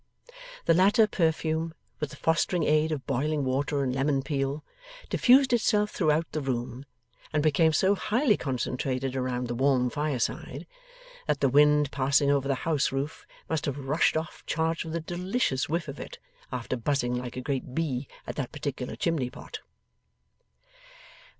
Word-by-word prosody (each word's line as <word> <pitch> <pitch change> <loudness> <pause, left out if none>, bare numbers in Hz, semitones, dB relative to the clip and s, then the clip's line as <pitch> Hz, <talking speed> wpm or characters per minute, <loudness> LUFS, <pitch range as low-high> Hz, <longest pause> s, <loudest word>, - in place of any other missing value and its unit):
The 165 - +5
latter 200 +6 +5
perfume, 160 -3 0 0.2
with 150 - -2
the - - -10
fostering 165 +2 +1
aid 155 +1 +2
of 145 -4 -3
boiling 145 +3 0
water 140 +2 0
and 130 -1 -1
lemon 135 0 +1
peel, 135 +1 -2 0.5
diffused 260 0 +5
itself 210 -3 +2
throughout 160 -2 +2
the 155 - -2
room, 125 0 -3 0.5
and 150 -1 +1
became 160 +1 +4
so 190 +6 +3
highly 220 +4 +2
concentrated 130 -1 -2
around 125 -1 -2
the 120 - -3
warm 130 -1 +2
fireside, 145 -2 -2 0.6
that 150 - +1
the 135 - +3
wind 150 +1 +4
passing 140 +1 +2
over 140 -1 +1
the 135 - +1
house 155 -4 +1
roof 135 +3 -4 0.2
must 160 -2 -1
have 140 -1 -2
rushed 145 +3 +1
off 160 +2 -5
charged 165 +1 0
with 160 0 -5
a 170 - -1
delicious 175 - -1
whiff 165 +1 -1
of 140 0 -7
it, - - -8 0.3
after 125 0 -3
buzzing 125 0 0
like 125 0 -4
a - - -2
great 130 -1 -3
bee 140 -5 -1 0.2
at - - -6
that 135 -4 -3
particular 140 -4 -4
chimneypot. 150 -7 -3
145 Hz, 155 wpm, -28 LUFS, 130-160 Hz, 0.6 s, The